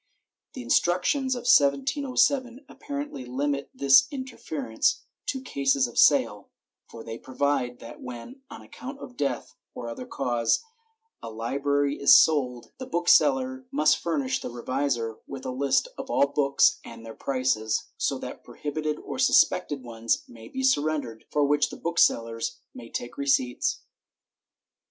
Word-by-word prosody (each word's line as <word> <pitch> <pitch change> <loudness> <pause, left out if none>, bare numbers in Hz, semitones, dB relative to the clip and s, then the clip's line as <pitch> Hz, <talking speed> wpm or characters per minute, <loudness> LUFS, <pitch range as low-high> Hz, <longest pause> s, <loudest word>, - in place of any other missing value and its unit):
The - - -7
instructions 185 - +1
of 245 - -5
1707 245 - +2
apparently 285 - -6
limit 140 +3 -2
this 135 -1 +5
interference 265 -2 -2 0.2
to 265 - -2
cases 140 - +1
of 120 - -3
sale, - - +3 0.4
for 115 - -10
they 115 0 -7
provide 130 -2 -1
that 115 - -11
when, 125 - -9
on - - -10
account 270 +2 -9
of 255 -3 -11
death 130 - -3 0.2
or 120 - -6
other 115 - -7
cause, 120 - 0 0.6
a - - -7
library 140 +5 -1
is 140 - +8
sold, 125 -6 +3
the 260 - -6
booksellers 260 +8 +3
must 280 +3 +3
furnish 265 -2 -1
the - - -5
revisor 120 -2 -2
with 135 -1 -8
a - - -2
list 140 - +1
of 265 - -6
all 140 - +3
books 140 -1 +2
and 115 0 -11
their 115 - -8
prices, 130 -5 -1
so - - -1
that - - -8
prohibited 150 +1 -4
or - - -7
sus - - +6
pected 140 -3 -5
ones 115 -1 -1
may 115 -1 -13
be 265 0 -5
surrendered, 145 - 0
for 145 -1 +2
which 145 +1 +2
the - - -9
booksellers 115 -9 +1 0.2
can 115 - -11
take 120 - -6
receipts. 130 -3 0
140 Hz, 145 wpm, -26 LUFS, -, 0.6 s, is